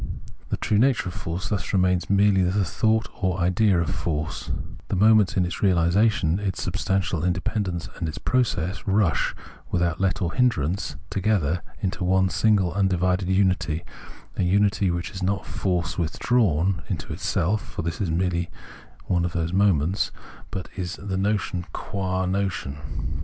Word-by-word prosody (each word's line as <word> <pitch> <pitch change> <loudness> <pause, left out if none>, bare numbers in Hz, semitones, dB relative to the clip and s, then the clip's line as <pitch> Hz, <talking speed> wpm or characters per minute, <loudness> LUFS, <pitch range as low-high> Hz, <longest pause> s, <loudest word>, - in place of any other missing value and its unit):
The - - -1
true 105 - +1
nature 125 -6 +2
of - - -8
force 85 +3 -4
thus 105 -4 -2
remains 90 -2 +2
merely 100 -1 +4
the 95 +2 +2
thought 110 +6 +1
or 95 -2 +1
idea 90 +2 +3
of 85 -3 0
force; 75 -2 -3 0.4
the - - -1
moments 105 0 +4
in 90 - +3
its 90 - -4
reali 90 -4 +3
sation, 100 -4 +2
its 100 -3 -2
substantial 95 -2 -1
independence 90 0 -1
and 85 -3 -2
its 75 - -6
process, 105 -8 0
rush, 95 -3 +2 0.3
without 85 -1 0
let 95 -2 +1
or 85 -2 -1
hindrance, 100 - +1 0.2
together 95 -5 +1 0.2
into 95 -1 -2
one 95 +1 +3
single 95 -3 +2
undivided 90 -1 +1
unity, 90 -4 +1 0.5
a - - +1
unity 100 +1 +2
which 85 +1 -2
is 95 -2 -7
not 95 +1 -1
force 90 -3 -1
withdrawn 90 0 +1
into 90 -6 -3
itself 100 +6 0
(for - - -6
this 85 +6 -3
is 95 - 0
merely 85 +1 0 0.6
one 90 -2 +1
of 85 -1 -2
those 85 0 -1
moments), 95 -2 +2 0.4
but 95 - -5
is 90 0 -4
its 100 - -10
notion 95 -2 0
qua 95 -1 -2
notion. 90 -7 -2
95 Hz, 155 wpm, -24 LUFS, 85-100 Hz, 0.6 s, merely